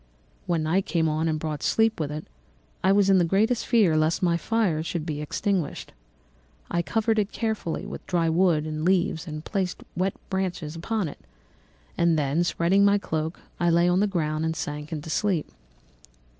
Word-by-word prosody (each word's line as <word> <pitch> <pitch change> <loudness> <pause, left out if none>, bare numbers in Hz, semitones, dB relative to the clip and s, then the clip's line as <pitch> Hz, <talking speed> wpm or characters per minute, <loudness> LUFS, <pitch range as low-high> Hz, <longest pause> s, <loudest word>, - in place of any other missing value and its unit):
When 170 -3 +1
night 180 +5 +1
came 165 -2 +1
on 155 +1 0
and 155 -1 0
brought 155 -2 -4
sleep 225 -2 +2
with 150 -2 -2
it, 150 +1 -5 0.6
I 190 - +4
was 195 0 +4
in 190 - +6
the - - +4
greatest 210 +7 +1
fear 210 -10 +4
lest 155 +3 +1
my 170 -1 +3
fire 180 -2 0
should 165 0 -3
be 150 -3 -3
extinguished. 175 +1 -2 0.8
I 170 - +1
covered 220 +4 +1
it 205 0 -1
carefully 220 -7 -2
with 205 - -8
dry 170 -2 +1
wood 165 -2 +3
and 155 0 -4
leaves 175 -2 +1
and 155 0 -6
placed 190 -3 -2
wet 185 +2 0 0.2
branches 180 -5 -2
upon 200 +3 -2
it; 145 - -9 0.8
and 170 -1 +3
then, 150 +3 +1
spreading 175 +3 +2
my 200 0 +5
cloak, 160 -4 -3 0.2
I 175 - +2
lay 170 +1 +4
on 180 +1 +3
the 205 - +3
ground 155 -5 -1
and 160 0 -1
sank 150 0 -5
into 155 0 -5
sleep. 190 -6 0
170 Hz, 185 wpm, -26 LUFS, 155-195 Hz, 0.8 s, in